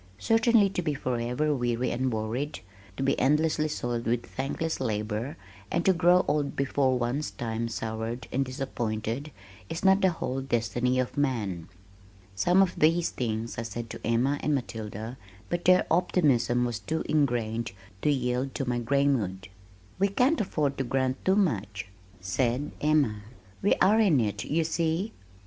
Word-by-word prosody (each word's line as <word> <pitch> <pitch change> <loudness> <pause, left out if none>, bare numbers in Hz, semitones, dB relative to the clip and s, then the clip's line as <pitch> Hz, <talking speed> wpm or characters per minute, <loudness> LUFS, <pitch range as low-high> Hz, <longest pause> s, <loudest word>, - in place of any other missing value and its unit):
Certainly 225 - +4
to 180 - -1
be 155 -4 -1
forever 125 +3 -1
weary 120 -1 0
and 130 +1 0
worried, 110 +3 -3 0.4
to - - -1
be 135 - +1
endlessly 155 +3 +2
soiled 120 -5 -3
with 120 +1 0
thankless 150 +5 -3
labor 110 +1 -2 0.3
and 170 - -1
to 190 - +6
grow 180 +1 +4
old 145 -1 0
before 135 -1 +1
one's 125 +5 -1
time 115 0 -3
soured 110 +2 -4
and 135 +2 +1
disappointed, 125 0 -3 0.4
is 165 - -4
not 190 +1 +5
the 190 - +5
whole 135 -6 -3
destiny 125 0 0
of 130 +2 -1
man! 105 - -1 0.6
Some 175 - +4
of 185 - -3
these 165 +2 +3
things 115 -1 -3
I - - -1
said 115 +1 -6
to - - -8
Emma 125 +5 +1
and 150 - +1
Matilda 110 -1 -5 0.3
but 175 0 -2
their 185 0 +5
optimism 135 -9 +2
was 120 -2 -3
too 160 0 -2
ingrained 120 -7 0 0.3
to - - +2
yield 130 -1 0
to 135 - -2
my 120 -1 0
gray 140 +4 +1
mood. 95 -9 -1 0.5
"We 200 - +4
can't 250 +10 +2
afford 150 -8 -1
to - - +1
grant 130 +1 -1
too 190 - +3
much," 105 - -1 0.3
said 120 +9 -1
Emma. 145 -9 +2 0.4
"We 200 - +3
are 210 +4 +4
in 185 -11 +4
it, 105 -2 -1
you 160 +3 +1
see." 165 +5 -1
130 Hz, 160 wpm, -28 LUFS, 115-155 Hz, 0.6 s, to